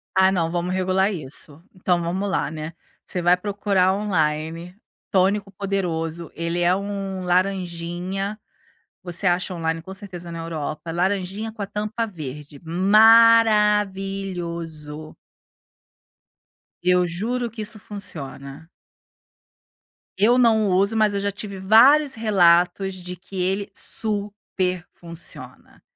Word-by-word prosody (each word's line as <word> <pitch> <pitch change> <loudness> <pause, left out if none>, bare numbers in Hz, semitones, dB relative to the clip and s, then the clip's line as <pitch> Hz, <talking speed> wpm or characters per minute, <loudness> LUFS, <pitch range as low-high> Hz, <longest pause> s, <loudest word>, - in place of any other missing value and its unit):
Ah, 190 0 +5
não, 165 -3 0
vamos 175 +1 -2
regular 190 +2 +1
isso. 150 -2 -7
Então 180 -1 +1
vamos 185 +4 -2
lá, 190 - -1
né, 155 +1 -6 0.3
você 180 - -4
vai 175 +1 +5
procurar 195 -1 +1
online, 165 -3 -2 0.3
tônico 195 +2 +1
poderoso, 170 -4 -3
ele 170 +1 -2
é 175 +1 +3
um 195 -1 -4
laranjinha, 180 +2 -2 0.6
você 175 +1 -2
acha 180 +1 +1
online, 165 -1 -2
com 190 +3 -9
certeza, 185 -3 -8
na 165 - -6
Europa, 165 0 -5
laranjinha 195 +4 -1
com 215 - -14
a - - -2
tampa 215 +3 -3
verde, 150 -5 -9
maravilhoso. 195 -6 +3 1.7
Eu 180 0 +3
juro 230 +8 -2
que 225 0 -7
isso 215 +1 +1
funciona. 155 -7 -7 1.5
Eu 225 +6 +4
não 220 -4 +4
uso 195 +4 +3
mas 215 -2 +3
eu 200 - -1
já 200 0 -1
tive 200 -1 -7
vários 260 +9 +5
relatos 190 -3 +3
de 180 -1 -7
que 185 +1 -7
ele 195 +3 -1
super 200 -4 -1
funciona. 170 -1 -7
185 Hz, 120 wpm, -22 LUFS, 170-205 Hz, 1.7 s, Ah